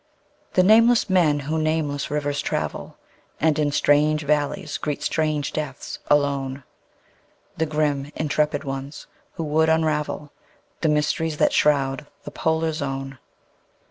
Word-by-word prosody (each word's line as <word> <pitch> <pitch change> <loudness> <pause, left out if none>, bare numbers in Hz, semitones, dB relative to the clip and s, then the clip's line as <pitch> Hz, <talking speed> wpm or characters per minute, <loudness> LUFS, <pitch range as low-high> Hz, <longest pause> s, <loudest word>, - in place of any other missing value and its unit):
The 185 - +4
nameless 225 +1 +5
men 155 -6 +3
who 155 +3 -2
nameless 155 -2 -1
rivers 145 -1 -1
travel, - - -4 0.4
And 155 -1 +2
in 145 -1 +1
strange 145 +1 +3
valleys 150 0 -1
greet 150 -1 -3
strange 155 -2 -1
deaths 150 -4 -5
alone; 140 -2 +1 0.9
The 160 - 0
grim, 150 -2 -1
intrepid 150 -1 0
ones 135 +1 -6 0.3
who 165 - -4
would 160 +1 +2
unravel 150 -2 0 0.5
The 160 - +1
mysteries 150 +1 0
that - - +3
shroud 140 -1 +2 0.2
the - - -8
Polar 160 0 0
Zone. 135 -3 -4
150 Hz, 125 wpm, -23 LUFS, 145-155 Hz, 0.9 s, nameless